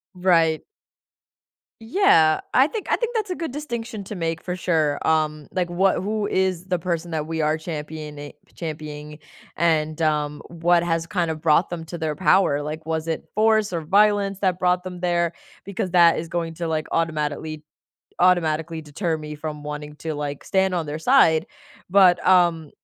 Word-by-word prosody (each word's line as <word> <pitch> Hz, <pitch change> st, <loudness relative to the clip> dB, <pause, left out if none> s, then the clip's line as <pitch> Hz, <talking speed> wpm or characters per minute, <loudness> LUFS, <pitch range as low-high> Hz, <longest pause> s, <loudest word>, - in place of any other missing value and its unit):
Right. 165 Hz, -3 st, +2 dB, 1.2 s
Yeah, 225 Hz, -, +4 dB
I 265 Hz, +3 st, +5 dB
think, 430 Hz, +3 st, -5 dB
I -, -, +3 dB
think 475 Hz, 0 st, -3 dB
that's 430 Hz, -3 st, -2 dB
a -, -, 0 dB
good 330 Hz, -4 st, -4 dB
distinction 235 Hz, -7 st, -5 dB
to 205 Hz, -, -7 dB
make 165 Hz, -3 st, -2 dB
for 180 Hz, -, -4 dB
sure, 160 Hz, -5 st, 0 dB
um, 155 Hz, -2 st, 0 dB
like, 180 Hz, -2 st, -1 dB
what 185 Hz, +2 st, +2 dB
who 210 Hz, +1 st, -1 dB
is 185 Hz, -2 st, 0 dB
the 180 Hz, -1 st, 0 dB
person 170 Hz, 0 st, -3 dB
that 155 Hz, -2 st, -2 dB
we 160 Hz, 0 st, -3 dB
are 155 Hz, +1 st, +1 dB
championing, 150 Hz, -2 st, -7 dB, 0.2 s
championing, 150 Hz, -2 st, -7 dB, 0.4 s
and, 155 Hz, -1 st, +1 dB
um, 150 Hz, -2 st, 0 dB
what 170 Hz, +1 st, +2 dB
has, 165 Hz, -1 st, 0 dB
kind 175 Hz, -2 st, -1 dB
of, 155 Hz, -1 st, -9 dB
brought 165 Hz, +2 st, +3 dB
them 170 Hz, -2 st, -5 dB
to 170 Hz, +2 st, -7 dB
their 160 Hz, -2 st, -2 dB
power, 150 Hz, -3 st, +3 dB
like, 155 Hz, +2 st, -6 dB
was 160 Hz, 0 st, -2 dB
it 160 Hz, -, -3 dB
force 215 Hz, -1 st, +3 dB
or 170 Hz, -, -1 dB
violence 200 Hz, +3 st, +2 dB
that 185 Hz, -3 st, 0 dB
brought 180 Hz, 0 st, +2 dB
them 180 Hz, -1 st, -7 dB
there, 175 Hz, -1 st, +1 dB, 0.3 s
because 200 Hz, -1 st, -3 dB
that 170 Hz, -2 st, +5 dB
is 165 Hz, -, -5 dB
going 165 Hz, -1 st, -3 dB
to, 170 Hz, 0 st, -4 dB
like, 155 Hz, -1 st, -1 dB
automatically 155 Hz, -1 st, -2 dB, 0.6 s
automatically 165 Hz, -2 st, +2 dB
deter 160 Hz, +3 st, -2 dB
me 150 Hz, 0 st, -7 dB
from 150 Hz, 0 st, -6 dB
wanting 150 Hz, 0 st, -6 dB
to, 155 Hz, +1 st, -5 dB
like, 145 Hz, -1 st, -5 dB
stand 190 Hz, -1 st, +1 dB
on 170 Hz, -2 st, -1 dB
their 145 Hz, +1 st, -4 dB
side, 160 Hz, -7 st, +4 dB, 0.4 s
but, 180 Hz, -2 st, +5 dB
um, 170 Hz, -4 st, +3 dB
165 Hz, 175 wpm, -23 LUFS, 155-185 Hz, 1.2 s, I